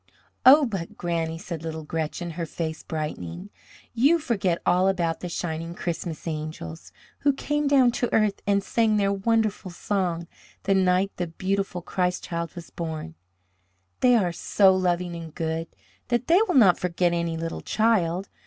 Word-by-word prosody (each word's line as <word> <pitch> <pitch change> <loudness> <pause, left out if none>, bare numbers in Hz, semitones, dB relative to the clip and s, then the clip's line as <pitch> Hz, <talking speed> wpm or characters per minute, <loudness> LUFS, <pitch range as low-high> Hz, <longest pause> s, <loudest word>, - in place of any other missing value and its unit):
"Oh, 285 +3 +9
but, 195 -8 -5
Granny," 165 -2 -2
said 170 -2 -6
little 160 -1 -5
Gretchen, 160 +2 -3
her 165 0 -4
face 160 -1 -4
brightening, 155 - -5 0.4
"you 275 +8 +4
forget 205 - 0
all 180 +2 +3
about 170 -4 0
the 180 - -5
shining 165 0 -4
Christmas 170 -2 -4
angels, 155 - -6 0.3
who 285 - +3
came 295 +2 -1
down 265 -3 +5
to 245 0 -2
earth 215 -2 +2
and 200 -1 +2
sang 220 +1 +2
their 200 -1 +2
wonderful 215 -1 0
song 175 -2 -2 0.4
the 195 - +2
night 190 +1 +2
the 175 - -2
beautiful 190 +1 -2
Christ 180 0 -1
Child 170 -2 -4
was 170 -1 -9
born! 160 - -5 0.9
They 250 -1 +5
are 190 -6 +2
so 190 +3 +4
loving 180 -1 0
and 165 -2 -8
good 165 0 -2 0.4
that 240 0 0
they 350 +5 +5
will 360 - 0
not 200 -9 +6
forget 175 -1 +1
any 170 -1 -1
little 165 0 -4
child. 195 -5 +1
180 Hz, 160 wpm, -25 LUFS, 165-205 Hz, 0.9 s, Oh